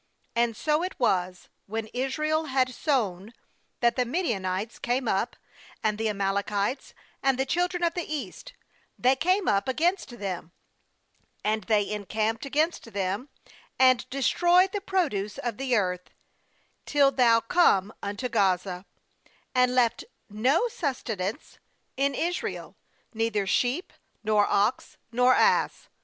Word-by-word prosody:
8And 235 -1 +1
so 300 +6 +1
it 365 +1 -4
was, 185 -6 0 0.2
when 220 +2 -3
Israel 305 +5 0
had 260 -3 +1
sown, 220 - -1 0.5
that 235 -1 +3
the 250 - +2
Midianites 225 - -2
came 245 +1 -1
up, 205 +3 0 0.5
and 215 -1 0
the 220 0 0
Amalekites, 200 +3 -1 0.3
and 270 -2 +2
the 265 - 0
children 355 +3 0
of 335 -1 +2
the 350 -3 -4
east; 300 -3 -6 0.4
they 255 +2 +3
came 365 +7 +1
up 200 +3 +2
against 315 -1 0
them; 185 -4 -5 0.9
4and 215 -1 0
they 210 -3 +2
encamped 215 +4 -2
against 300 -4 -1
them, 200 +7 -2 0.5
and 255 -1 +4
destroyed 350 +7 +3
the 410 - -3
produce 275 - -1
of 235 -3 -3
the 260 -2 0
earth, 180 -4 -1 0.8
till 280 -2 +4
thou 240 -3 +4
come 225 - +3
unto 205 +5 -3
Gaza, 190 -4 0 0.7
and 250 -1 +3
left 235 -2 +2 0.3
no 255 - +2
sustenance 230 - -4 0.4
in 275 +1 +1
Israel, 350 +2 -3 0.4
neither 225 -3 0
sheep, 250 - 0 0.3
nor 210 -1 +3
ox, 205 +4 0
nor 250 +2 +4
ass. - - +2
240 Hz, 130 wpm, -27 LUFS, 205-275 Hz, 0.9 s, and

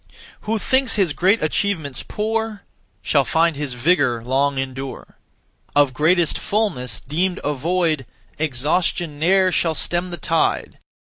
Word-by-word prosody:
Who 225 - +2
thinks 260 +3 +1
his 190 -8 +2
great 190 +6 +2
achievements 155 -4 -1
poor 220 0 -3 0.4
Shall 140 -2 +3
find 165 +4 +2
his 140 -2 -3
vigour 125 -3 +1
long 135 +3 +1
endure. 135 0 -6 0.6
Of 145 -2 +4
greatest 165 +4 +2
fulness, 200 - -1
deemed 175 +7 -1
a 145 - 0
void, 155 -2 0 0.3
Exhaustion 155 +2 0
ne'er 185 +3 +3
shall 165 -2 +1
stem 175 +3 -1
the 175 - -5
tide. 165 +1 0
160 Hz, 130 wpm, -21 LUFS, 140-185 Hz, 0.6 s, Of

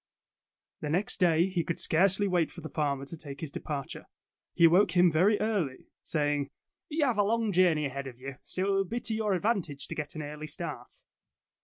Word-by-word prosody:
The 150 - -4
next 185 +8 0
day, 170 -2 +4
he 185 -3 -1
could 165 -1 -3
scarcely 190 +4 +3
wait 175 -4 +1
for - - -10
the 160 - -7
farmer 140 -3 -1
to 155 - -5
take 145 -3 -9
his 155 -3 -5
departure. 140 -2 -5 0.5
He 170 - +6
awoke 180 +2 +4
him 175 -1 +6
very 190 +7 +3
early, 200 -12 -2
saying: 145 -2 -1 0.4
''You 300 0 +2
have 240 -6 0
a - - +5
long 225 +1 +1
journey 175 -5 +3
ahead 140 0 -4
of 125 -2 -9
you, 135 0 -7
so 185 - -3
it - - 0
will 195 0 +2
be 235 +6 -3
to 225 - -1
your 215 -2 0
advantage 180 -8 -1
to - - -3
get 150 +2 -5
an 155 - -4
early 150 +1 -7
start. - - -6
170 Hz, 205 wpm, -29 LUFS, 150-200 Hz, 0.5 s, He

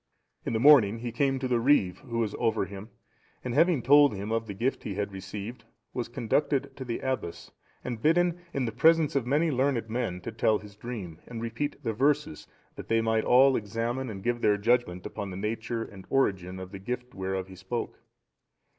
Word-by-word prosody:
In - - -1
the 110 - +1
morning 120 -6 +7
he 120 +1 -5
came 135 +3 +1
to 130 0 -2
the 125 -1 +2
reeve(710) 115 -8 +3
who 115 - -2
was 110 -3 0
over 110 -3 +1
him, 100 +3 -9 0.5
and 125 - -3
having 160 -2 +3
told 145 -3 +6
him 100 +3 -5
of 115 0 -1
the 100 - -6
gift 125 +7 -1
he 100 - -5
had 100 0 -2
received, 100 +4 -7 0.3
was 120 - -3
conducted 135 +3 0
to 135 - -5
the 120 -2 -4
abbess, 130 -10 -4 0.3
and 120 -3 -5
bidden, 175 +3 +3
in 135 -5 -1
the 115 - -2
presence 160 +6 +4
of 130 -4 0
many 155 +5 +2
learned 130 -4 0
men, 115 -7 -2
to 115 - -5
tell 110 -1 +2
his 105 -1 -13
dream, 100 -8 -7
and 120 -2 -6
repeat 115 +5 -4
the 115 - -1
verses, 140 - 0 0.3
that - - -8
they 115 0 +2
might 110 0 +1
all 130 +2 +6
examine 115 +4 -2
and 95 -3 -7
give 120 0 -1
their 105 -1 +3
judgement 105 -5 +1
upon 100 -2 -5
the 90 - -6
nature 115 +3 -3
and 95 -4 -12
origin 95 -9 0
of 95 0 -8
the 100 - -7
gift 125 +4 -5
whereof 95 -1 -3
he 95 - -11
spoke. 95 +6 -5
115 Hz, 205 wpm, -28 LUFS, 105-130 Hz, 0.5 s, morning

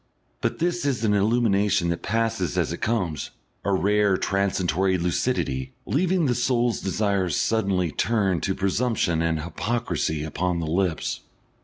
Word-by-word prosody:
But - - -1
this 175 +1 0
is 135 -5 0
an 105 -2 +3
illumination 105 -3 +2
that 85 - -2
passes 115 -5 -1
as - - +1
it - - -7
comes, 95 -10 -1 0.3
a 100 - 0
rare 100 0 +3
transitory 95 -1 +1
lucidity, 70 -6 -1
leaving 175 +3 +1
the 125 - +2
soul's 120 -1 +1
desire 100 -1 0
suddenly 95 -5 +1
turned 100 -2 +1
to 95 - -1
presumption 100 -4 0
and 80 -1 0
hypocrisy 85 -3 -2
upon 85 +3 -1
the 85 - -2
lips. 85 +1 -1
100 Hz, 140 wpm, -24 LUFS, 85-115 Hz, 0.3 s, an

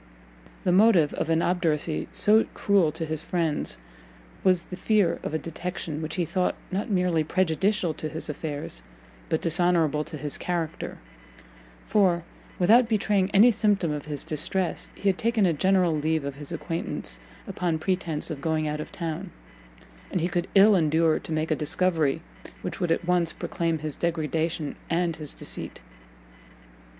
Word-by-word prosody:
The 180 - +2
motive 185 -5 +5
of 165 - -2
an 165 0 +2
obduracy 165 -3 0
so 215 +2 +4
cruel 195 -7 +3
to 160 +1 -4
his 155 -1 -1
friends 165 - -1 0.7
was 185 -2 +3
the 180 - -8
fear 205 -1 +2
of 155 - -3
a - - +3
detection 165 -1 -5
which 155 0 -4
he 175 - 0
thought 180 +3 0 0.2
not 200 +5 -2
merely 180 -5 +2
prejudicial 185 +2 +1
to 155 - -5
his 160 +1 -6
affairs, 145 - -4 0.5
but - - 0
dishonourable 165 -3 +2
to 155 - -6
his 145 0 -2
character: 170 -3 -3 0.9
for, 190 -5 +3 0.3
without 225 +6 +5
betraying 205 -3 +2
any 215 +5 +6
symptom 205 -7 +1
of 150 -1 -4
his 150 -2 -4
distress, 175 +4 -1
he 200 - -3
had 190 -1 +2
taken 225 -3 +2
a 170 - +3
general 180 +1 +3
leave 155 0 0
of 140 - -3
his 145 +1 -8
acquaintance 165 - -3 0.3
upon 170 -3 -1
pretence 170 -2 -2
of 145 -3 -5
going 155 0 0
out 150 0 -2
of 155 - -6
town, 170 +1 -4 0.8
and - - -1
he 170 - +1
could 175 -1 -1
ill 200 +2 +7
endure 160 -1 +3
to - - -10
make 155 +1 -1
a - - +3
discovery 160 -1 0 0.4
which 180 - -4
would 175 -3 0
at 170 - +1
once 175 -2 +2
proclaim 165 -1 -2
his 155 -1 -5
degradation 160 -1 -1
and 170 -1 0
his 150 -2 -7
deceit. - - -5
170 Hz, 160 wpm, -26 LUFS, 155-185 Hz, 0.9 s, ill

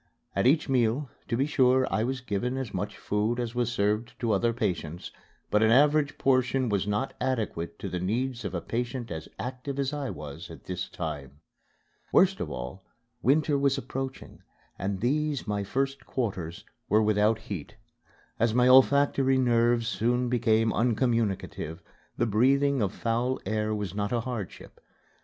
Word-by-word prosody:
At - - +3
each 150 +4 +3
meal, 125 +1 +1 0.2
to 115 - -1
be 135 - +2
sure, 130 -3 +3
I 110 - +2
was 130 +2 -2
given 125 +3 -2
as 130 -5 -4
much - - -3
food 105 +4 -1
as 120 -2 -2
was 120 -1 0
served 105 +2 -1
to 115 -2 0
other 110 +4 +2
patients, 90 -8 -3 0.4
but 105 - +3
an 110 - +5
average 145 +4 +4
portion 130 -1 +2
was 100 -1 0
not 105 +6 -1
adequate 115 -10 -2
to - - -5
the 90 - -3
needs 120 +6 -1
of 95 -2 -4
a 85 - -2
patient 120 +1 -3
as 80 -1 -6
active 130 +2 -5
as 140 0 -1
I 145 -2 -3
was 75 -2 -8
at - - -11
this 90 -1 -4
time. 70 -4 -6 0.7
Worst 190 +1 +4
of 75 - -3
all, 65 +8 -6 0.4
winter 145 +3 +3
was 140 0 +2
approaching 135 0 -6 0.4
and 95 0 -2
these, 145 +3 0
my 105 -1 -1
first 135 +6 -2
quarters, 95 -9 -3 0.2
were 110 +1 +4
without 105 +1 +3
heat. 100 -8 -7 0.6
As 115 0 +2
my 125 0 +5
olfactory 135 0 +5
nerves 120 -2 +3
soon 120 +1 +1
became 115 -2 +2
uncommunicative, 115 - 0 0.4
the 120 - +2
breathing 135 +5 +3
of 100 -3 +1
foul 120 +3 -1
air 110 +1 0
was 105 -4 -4
not 100 0 -2
a 120 -1 +1
hardship. 115 -6 -7
120 Hz, 165 wpm, -28 LUFS, 105-130 Hz, 0.7 s, an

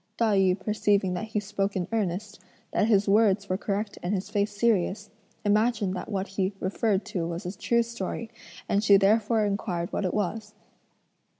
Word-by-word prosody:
Tai 220 -3 +2
yü 190 -1 +3
perceiving 200 -2 +1
that 180 +4 -3
he 220 -1 -1
spoke 200 -1 -2
in 180 -2 -1
earnest, 205 -1 -2 0.3
that 215 - +2
his 205 -2 +3
words 200 -1 +3
were 185 - 0
correct 205 +1 -3
and 180 +4 -1
his 190 - -4
face 205 0 +1
serious, 205 -1 0 0.3
imagined 210 -1 +2
that 180 - -6
what 195 -2 -2
he 195 0 -1
referred 200 +1 0
to 170 -3 -3
was 170 +3 -5
a 180 +3 -4
true 235 0 +1
story, 230 0 -5 0.4
and 200 +1 +1
she 200 -2 +7
therefore 215 +2 +3
inquired 190 -4 -2
what - - -1
it 185 - -1
was? 210 +1 -3
205 Hz, 180 wpm, -27 LUFS, 190-215 Hz, 0.4 s, she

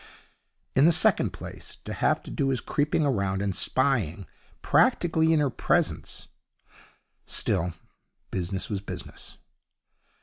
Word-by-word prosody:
In 135 - +6
the 170 - +7
second 160 - +3
place, - - -8
to - - -4
have - - +1
to - - -9
do 135 - 0
his 130 -2 +1
creeping 150 +1 0
about 100 -8 0
and 100 -2 -1
spying 110 - 0 0.4
practically 160 -1 +3
in 160 - +4
her 145 -3 +1
presence - - -1 1.0
Still, 85 0 0 0.6
business 95 +1 -2
was 100 -3 -3
business. 100 - -8
125 Hz, 125 wpm, -27 LUFS, 95-145 Hz, 1.0 s, the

